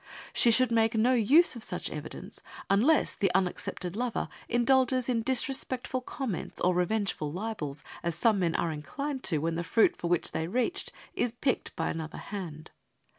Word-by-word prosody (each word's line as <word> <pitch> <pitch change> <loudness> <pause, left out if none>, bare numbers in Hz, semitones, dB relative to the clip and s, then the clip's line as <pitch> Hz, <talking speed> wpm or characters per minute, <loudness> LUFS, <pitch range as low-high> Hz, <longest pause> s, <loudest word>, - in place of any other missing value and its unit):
She 240 - +5
should 250 +1 +4
make 225 0 +3
no 235 +4 +3
use 260 +8 +5
of 235 - -4
such - - -1
evidence, - - -7 0.3
unless 260 +10 +4
the 195 - 0
unaccepted 180 -1 -1
lover 240 0 -2 0.2
indulges 255 +1 +3
in 240 -3 +1
disrespectful 260 0 -1
comments 250 - -4
or 180 - +3
revengeful 180 -4 -1
libels, 170 -7 -4 0.2
as 170 -2 -1
some 210 +4 +3
men 170 -3 +1
are 170 - 0
inclined 265 - -4
to 160 - +2
when 165 +3 -1
the 170 +1 -2
fruit 220 +7 +3
for 175 - -4
which 175 -1 0
they 160 - -2
reached 245 - -1 0.2
is 240 - 0
picked 260 +1 -1
by 165 - -1
another 160 -1 -6
hand. 165 -6 -7
220 Hz, 170 wpm, -29 LUFS, 170-250 Hz, 0.3 s, She